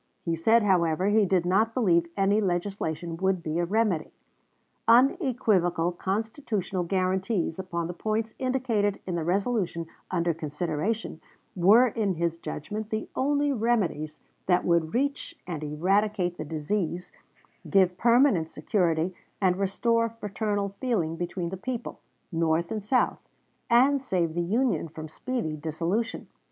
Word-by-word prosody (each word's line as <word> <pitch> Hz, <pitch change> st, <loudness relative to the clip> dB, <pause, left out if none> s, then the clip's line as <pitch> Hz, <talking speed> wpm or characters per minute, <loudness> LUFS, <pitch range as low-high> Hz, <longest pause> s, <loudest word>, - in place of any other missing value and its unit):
He 165 Hz, -1 st, 0 dB
said, 225 Hz, +7 st, +4 dB
however, 180 Hz, -1 st, +2 dB
he 210 Hz, -1 st, +4 dB
did 180 Hz, -2 st, +2 dB
not 215 Hz, +5 st, +2 dB
believe 170 Hz, -9 st, +3 dB
any 200 Hz, +2 st, +3 dB
legislation 175 Hz, -3 st, -2 dB
would 190 Hz, -1 st, 0 dB
be 160 Hz, +1 st, -2 dB
a 175 Hz, -, +1 dB
remedy. 200 Hz, -4 st, 0 dB, 0.8 s
Unequivocal 230 Hz, -, +3 dB
constitutional 200 Hz, 0 st, -2 dB
guarantees 185 Hz, 0 st, 0 dB
upon 170 Hz, -3 st, -3 dB
the 175 Hz, -, -4 dB
points 220 Hz, +4 st, -2 dB
indicated 245 Hz, -6 st, 0 dB
in 185 Hz, -, -3 dB
the 170 Hz, -2 st, -1 dB
resolution 185 Hz, -1 st, 0 dB, 0.2 s
under 170 Hz, -1 st, +1 dB
consideration 160 Hz, +5 st, -3 dB, 0.3 s
were 200 Hz, +7 st, +6 dB
in 210 Hz, -5 st, -1 dB
his 170 Hz, 0 st, -1 dB
judgment 210 Hz, +8 st, -5 dB
the 220 Hz, 0 st, -3 dB
only 285 Hz, +1 st, +1 dB
remedies 200 Hz, -, 0 dB, 0.3 s
that 180 Hz, -1 st, +3 dB
would 170 Hz, 0 st, +1 dB
reach 280 Hz, +3 st, -1 dB
and 165 Hz, -4 st, -5 dB
eradicate 180 Hz, +4 st, +1 dB
the 155 Hz, -, -6 dB
disease, 170 Hz, +3 st, -3 dB, 0.6 s
give 185 Hz, -3 st, +4 dB
permanent 235 Hz, -, +4 dB
security, 165 Hz, +1 st, 0 dB, 0.3 s
and 185 Hz, -2 st, +2 dB
restore 230 Hz, +4 st, +1 dB
fraternal 210 Hz, -2 st, -2 dB
feeling 205 Hz, -11 st, 0 dB
between 175 Hz, 0 st, -3 dB
the 190 Hz, -, -5 dB
people, 240 Hz, +4 st, -5 dB, 0.3 s
North 165 Hz, 0 st, 0 dB
and 215 Hz, -2 st, -3 dB
South, 250 Hz, +5 st, +1 dB, 0.5 s
and 265 Hz, +4 st, +4 dB
save 175 Hz, -10 st, 0 dB
the 175 Hz, -, -1 dB
Union 225 Hz, +3 st, 0 dB
from 155 Hz, 0 st, -8 dB
speedy 160 Hz, 0 st, -3 dB
dissolution. 165 Hz, +9 st, -2 dB
190 Hz, 135 wpm, -27 LUFS, 170-225 Hz, 0.8 s, were